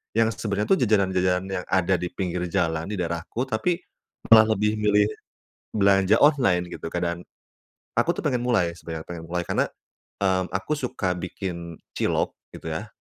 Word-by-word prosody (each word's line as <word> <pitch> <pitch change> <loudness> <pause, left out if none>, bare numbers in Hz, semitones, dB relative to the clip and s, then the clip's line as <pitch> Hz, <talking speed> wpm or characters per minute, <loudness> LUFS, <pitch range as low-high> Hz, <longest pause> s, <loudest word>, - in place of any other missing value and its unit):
yang 115 0 +4
sebenarnya 105 -1 -2
tuh 190 - +5
jajanan-jajanan 95 -4 +2 0.2
yang - - -17
ada 95 0 +2
di 90 - -2
pinggir 90 -2 -2
jalan 80 -3 0
di - - -2
daerahku, 85 +7 -2
tapi 150 +9 0 0.5
malah 110 -1 +8
lebih 105 +1 +2
milih 105 -1 +4 0.7
belanja 100 0 +4
online, 100 - +4
gitu, - - -6
Kak, 90 - -1
dan, 85 0 -1 0.8
aku - - +3
tuh - - -2
pengen 125 -1 +1
mulai 100 -9 +2
sebenarnya, 80 -2 -7
pengen 85 -2 -6
mulai 90 +1 -1
karena, - - +2 0.6
mmm, 95 -1 +1
aku 95 +10 -2
suka 115 -9 -2
bikin 85 -2 -6 0.2
cilok, - - 0 0.2
gitu, - - -8
ya. 100 +7 -4
95 Hz, 160 wpm, -25 LUFS, 90-110 Hz, 0.8 s, malah